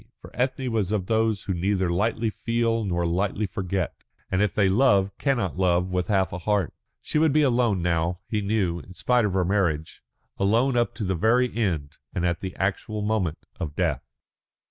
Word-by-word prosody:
For - - -13
Ethne 130 0 -1
was 105 -4 0
of 105 -4 0
those 110 -1 +1
who 95 - -2
neither 95 0 0
lightly 110 +4 0
feel 115 0 0
nor 85 -3 -1
lightly 95 +5 0
forget, 95 -1 -2 0.4
and 95 - +2
if 105 -2 +2
they 100 -2 +2
love 100 -2 +3
cannot 120 - 0
love 90 0 +2
with 90 -1 -1
half 95 -4 +1
a 90 - -4
heart. 100 -1 0 0.3
She 150 - 0
would 160 -1 +4
be 155 +2 +4
alone 120 -8 +2
now, 85 0 0
he 105 -2 -1
knew, 100 -4 0
in 90 +2 -13
spite 125 +1 +2
of 100 - -1
her 95 -2 +2
marriage, 85 -6 0 0.4
alone 115 +7 +2
up 120 -1 +1
to 110 - -4
the 95 -1 0
very 120 +8 +2
end 80 -10 -2 0.2
and 85 - 0
at 85 -1 0
the 95 -2 -6
actual 105 +2 -2
moment 105 -7 -1
of 75 -2 -4
death. 65 -8 -2
100 Hz, 190 wpm, -25 LUFS, 90-110 Hz, 0.4 s, would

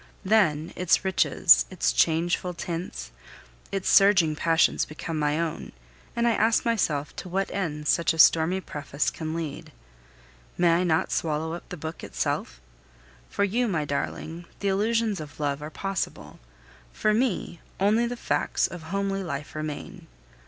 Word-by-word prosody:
Then, 170 -7 +2
its 180 +1 +2
riches, 60 - +4
its - - 0
changeful 170 - +1
tints, 165 - -5 0.6
its 195 -1 -2
surging 190 -6 +5
passions 165 +1 +2
become 155 +1 -5
my 150 +1 +1
own, 165 -2 -4 0.4
and 235 0 +1
I - - +4
ask 225 +1 +2
myself 155 -11 0
to 185 - -6
what 195 +2 -1
end 150 -6 -3
such 170 - +3
a 165 - -4
stormy 165 +3 +5
preface 145 -3 -3
can 160 0 -5
lead. 160 -4 -5 0.9
May 175 -1 +4
I 180 - +1
not 165 -3 +1
swallow 160 0 -1
up 175 - -8
the 180 - -6
book 160 +2 -7
itself? - - -3 0.7
For - - -1
you, 235 +5 +1
my 165 -7 -1
darling, 160 +4 -4
the 200 - 0
illusions 215 +1 +1
of 150 -1 -10
love 145 -1 -1
are 150 - -6
possible; 195 +4 -4 0.5
for 215 - +1
me, 215 -7 -1 0.2
only 215 +5 +3
the 245 0 -5
facts - - 0
of 175 -2 -6
homely 195 0 -1
life 145 -4 -5
remain. 155 -1 -6
170 Hz, 150 wpm, -26 LUFS, 155-195 Hz, 0.9 s, surging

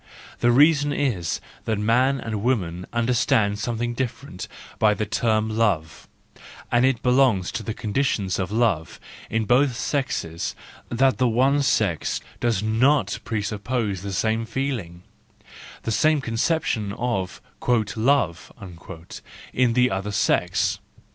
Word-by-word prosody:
The 120 - +4
reason 145 +2 +5
is 115 - -1 0.3
that 110 -2 0
man 125 +6 +2
and 110 -3 -4
woman 90 -8 -1
understand 115 -3 +1
something 120 +2 -2
different 125 -5 -5 0.3
by 105 -1 +4
the 110 - -2
term 110 0 +1
love,—and 105 +4 -2
it 130 -3 +1
belongs 125 -7 +3
to - - -4
the 110 - -5
conditions 105 -4 -1
of 95 0 -2
love 105 -8 0 0.3
in 110 -1 0
both 125 +2 +3
sexes 135 - -2 0.3
that 130 +2 +2
the 130 - +4
one 130 +5 +3
sex 105 - +1 0.2
does 115 -4 0
not 110 0 +2
presuppose 105 -2 -2
the 100 0 -5
same 110 +4 0
feeling, 110 -9 -4 0.8
the 115 - -2
same 155 +8 +3
conception 115 -4 -1
of 105 -6 -2
" - - -37
love/' 100 - -2 0.3
in 125 -2 +2
the 125 +1 +3
other 95 +2 -2
sex. 100 - +1
115 Hz, 125 wpm, -23 LUFS, 100-125 Hz, 0.8 s, reason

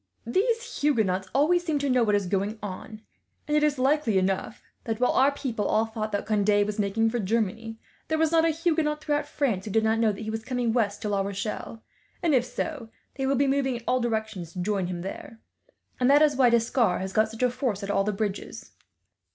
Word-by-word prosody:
"These 460 - -1
Huguenots 205 -10 +1
always 330 +6 +3
seem 320 -4 0
to 285 0 -1
know 255 -2 +3
what 210 -2 +2
is 200 -1 0
going 200 +4 -1
on, 215 +2 -7 0.4
and 300 - 0
it 300 - +4
is 300 -1 +2
likely 265 -5 +2
enough 190 +3 -1 0.2
that, 225 -1 -2
while 250 - +3
our 270 +2 +4
people 245 -7 -3
all 220 - +2
thought 220 -1 -4
that 205 - -2
Conde 205 -1 +2
was 210 0 -4
making 215 +3 +1
for 240 - -1
Germany, 225 +2 -2 0.3
there 315 - 0
was 320 0 +2
not 325 -1 +4
a 330 - +3
Huguenot 315 -2 0
throughout 295 -1 0
France 235 -13 -1
who - - -5
did 220 +2 +2
not 220 +1 +2
know 225 -2 +3
he 220 +2 -5
was 220 0 -4
coming 245 -2 -1
west 210 -4 0
to 210 - -1
La 200 -1 +1
Rochelle; 205 +3 -5 0.4
and 330 -3 +2
if 250 -2 +3
so, 255 -2 -5 0.2
they 270 -1 -2
will 275 - +2
be 280 +2 +2
moving 270 -1 +1
in 235 - -7
all 255 - +2
directions 220 -7 -3
to 185 - -6
join 195 -2 -1
him 175 -1 -4
there, 195 +4 -8 0.6
and 250 +1 +3
that 290 +2 +6
is 295 -2 +3
why 255 -2 +5
D'Escars 230 -4 +2
has 190 0 -5
got 215 +2 +3
such 225 +2 -5
a 250 - +3
force 245 -5 -2
at 200 - -2
all 195 - +2
the 210 - 0
bridges. 205 -1 -4
225 Hz, 225 wpm, -26 LUFS, 205-275 Hz, 0.6 s, that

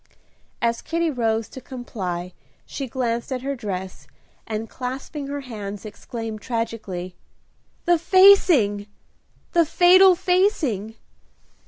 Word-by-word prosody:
As 235 0 +1
Kitty 335 0 -1
rose 225 -4 0
to 260 - -10
comply 185 -9 -5 0.3
she 275 - -5
glanced 235 0 -2
at 255 -1 -3
her 275 +1 -2
dress, 190 -5 -6 0.4
and, 220 0 -3
clasping 265 +4 -6
her 285 0 -4
hands, 210 -5 -7
exclaimed, 220 0 -7
tragically, 215 -6 -4 0.7
"The 345 -1 +4
facing, 340 - +5 0.6
the 340 -2 +4
fatal 365 +3 +6
facing! 345 - +1
240 Hz, 110 wpm, -23 LUFS, 215-315 Hz, 0.7 s, fatal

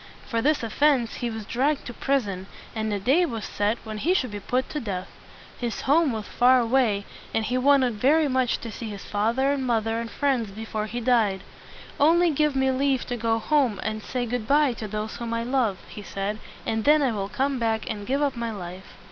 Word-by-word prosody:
For 230 -3 -1
this 295 0 +2
offense 250 +1 +2
he 240 - -2
was 220 -2 -6
dragged 275 +6 0
to 240 - -6
prison, 205 -9 -1 0.3
and 220 -1 -1
a 205 - -1
day 270 - +3
was 230 -10 -3
set 205 +3 0
when 215 -1 -6
he 350 - +2
should 255 - 0
be 205 - -5
put 250 +6 -1
to 300 - -2
death. 195 -7 -4 0.5
His 240 -2 -3
home 300 +1 +3
was 220 -2 -4
far 250 +1 +4
away, 230 -4 +2 0.3
and 225 - +1
he 245 - -1
wanted 255 -4 +3
very 300 +4 +4
much 260 -2 +1
to 230 - -6
see 225 +1 -6
his 200 -1 -8
father 230 +7 +1
and 280 -2 -1
mother 225 -2 0
and 230 0 -4
friends 260 -7 0
before 215 +1 -4
he 240 +2 -4
died. 220 -6 +2 0.6
"Only 335 +4 +5
give 300 -1 +1
me 265 0 +2
leave 265 -1 +1
to 245 - -1
go 225 -1 +1
home 250 -4 +1
and 215 0 -3
say 245 +3 -3
good 240 -2 -3
by 290 -2 +4
to 220 -2 -6
those 215 +1 -4
whom 230 -1 -3
I 230 - -1
love," 240 -6 +1
he 210 - -9
said, 200 +1 -4 0.3
"and 220 0 -1
then 300 +2 +5
I 260 - +2
will 200 -2 -3
come 270 +2 -1
back 225 -1 0
and 205 -1 -5
give 275 +3 +1
up 280 -3 0
my 235 -1 -3
life." 185 -3 -8
235 Hz, 220 wpm, -25 LUFS, 215-270 Hz, 0.6 s, Only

